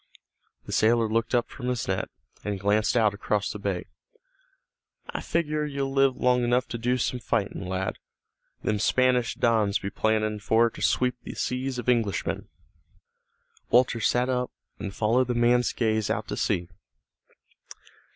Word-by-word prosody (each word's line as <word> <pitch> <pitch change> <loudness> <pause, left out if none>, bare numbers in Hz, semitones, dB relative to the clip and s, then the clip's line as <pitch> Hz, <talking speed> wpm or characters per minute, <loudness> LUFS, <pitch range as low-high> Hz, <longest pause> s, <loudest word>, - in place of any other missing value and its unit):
The - - -8
sailor 115 +1 +3
looked 115 +3 0
up 120 - +2
from 125 - -7
his 125 -2 -1
net, - - -1 0.3
and 100 -2 -3
glanced 105 +4 +2
out 110 -3 +3
across 105 0 -1
the 105 - -7
bay. 100 -3 -2 1.3
"I - - -4
figure 155 -2 -1
you'll 140 -2 -3
live 135 -1 +3
long 125 -1 +2
enough 120 +1 +2
to 120 - -4
do 125 +2 +1
some 125 +1 -1
fightin', 100 -4 -2
lad. 95 +1 -2 0.6
Them 105 -1 0
Spanish 125 +2 +2
dons 110 -4 +2
be 100 - -5
plannin' 110 0 0
for 115 +2 +3
to - - -11
sweep 125 0 +1
the - - -8
seas 130 +1 -2
of 125 - -5
Englishmen." 115 -5 0 1.2
Walter 125 -1 +4
sat 125 +3 +2
up, 125 -1 0 0.3
and 100 -1 -4
followed 115 +5 +2
the 125 - -1
man's 120 +1 +3
gaze 110 -2 0
out 110 0 -1
to - - -2
sea. 90 -4 0
115 Hz, 155 wpm, -26 LUFS, 105-125 Hz, 1.3 s, Walter